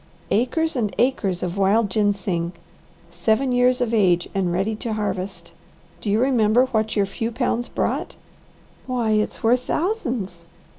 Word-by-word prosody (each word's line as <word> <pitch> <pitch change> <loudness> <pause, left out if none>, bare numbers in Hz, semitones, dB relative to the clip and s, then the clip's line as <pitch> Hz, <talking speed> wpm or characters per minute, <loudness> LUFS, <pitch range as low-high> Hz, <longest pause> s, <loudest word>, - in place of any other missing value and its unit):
"Acres 315 +8 +1
and 220 -5 -1
acres 205 -9 +1
of 180 +2 -3
wild 200 +2 +3
ginseng, 195 -4 0 0.6
seven 235 +4 +1
years 250 +1 +3
of 235 -2 0
age 180 -5 +3
and 190 -3 0
ready 195 +5 0
to 225 0 -3
harvest. 200 -2 -4 0.5
Do 210 - -3
you 210 +2 +2
remember 245 -2 +3
what 220 -4 -1
your 200 -2 +3
few 225 +4 -4
pounds 240 0 -1
brought?" - - -2 0.7
"Why 245 -4 0
it's 215 0 0
worth 240 +2 +4
thousands!" 250 - -2
220 Hz, 145 wpm, -22 LUFS, 195-245 Hz, 0.7 s, worth